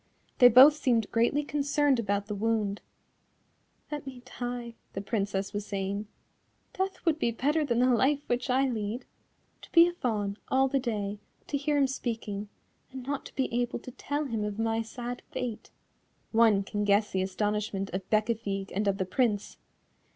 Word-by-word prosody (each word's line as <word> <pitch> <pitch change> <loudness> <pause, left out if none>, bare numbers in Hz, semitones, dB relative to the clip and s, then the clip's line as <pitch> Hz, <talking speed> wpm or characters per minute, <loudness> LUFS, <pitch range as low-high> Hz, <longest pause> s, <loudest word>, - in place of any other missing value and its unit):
They 245 - +10
both 255 +5 +9
seemed 240 -7 +1
greatly 240 +6 +2
concerned 285 -2 +1
about 205 -2 0
the 210 - -4
wound: 210 -1 0 1.1
"Let 295 -2 -5
me 255 -2 -8 0.2
die," 245 -1 -4 0.2
the 195 - -3
Princess 200 -2 -2
was 205 0 -2
saying, 200 +1 -3 0.7
"death 380 0 -3
would 320 -2 +2
be 235 - +2
better 290 +7 +1
than 240 -5 0
the 250 - +4
life 275 +4 +2
which 245 +2 -1
I 265 +2 +3
lead. 225 0 -3 0.6
To - - -14
be 335 0 +8
a 350 - -3
Fawn 210 - -2
all 265 +1 +3
the 275 +1 +1
day, 210 -5 -3 0.3
to - - -3
hear 290 +1 +1
him 280 - +4
speaking, 225 -6 -4 0.4
and 260 -1 -8
not 280 +1 -3
to - - -18
be 265 -3 -1
able 240 0 0
to 255 - -10
tell 290 +4 -3
him 225 -5 -2
of 210 -1 -3
my 225 0 0
sad 240 +2 -6
fate." 235 -4 -5 0.6
One 220 -3 +4
can 205 +1 -3
guess 205 +1 +3
the 190 - 0
astonishment 200 +1 -2
of 190 0 -4
Bécafigue 215 -3 0
and 205 +2 0
of 195 -1 +2
the 190 - -1
Prince. 210 +1 0
230 Hz, 175 wpm, -29 LUFS, 205-265 Hz, 1.1 s, They